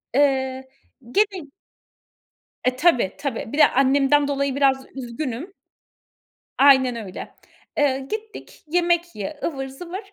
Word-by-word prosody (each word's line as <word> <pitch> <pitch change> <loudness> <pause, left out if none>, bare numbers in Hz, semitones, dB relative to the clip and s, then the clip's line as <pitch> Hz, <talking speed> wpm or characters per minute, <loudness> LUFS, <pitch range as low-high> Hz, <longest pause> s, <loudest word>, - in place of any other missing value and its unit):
Eee, 265 -2 +1 0.4
gene 395 -2 +1 1.2
E, 255 0 +1
tabii, 255 - +3
tabii. 255 -5 -4
Bir 290 - -3
de - - +7
annemden 275 +2 +3
dolayı 280 -1 -1
biraz 270 -1 +2
üzgünüm. 260 +6 -5 1.1
Aynen 265 -3 +5
öyle. 185 - -9 0.4
Eee, 275 -2 +2
gittik, 440 0 -7
yemek 345 +1 +1
ye, 215 +9 -6
ıvır 270 -4 -3
zıvır. 345 +8 -7
275 Hz, 115 wpm, -22 LUFS, 260-330 Hz, 1.2 s, de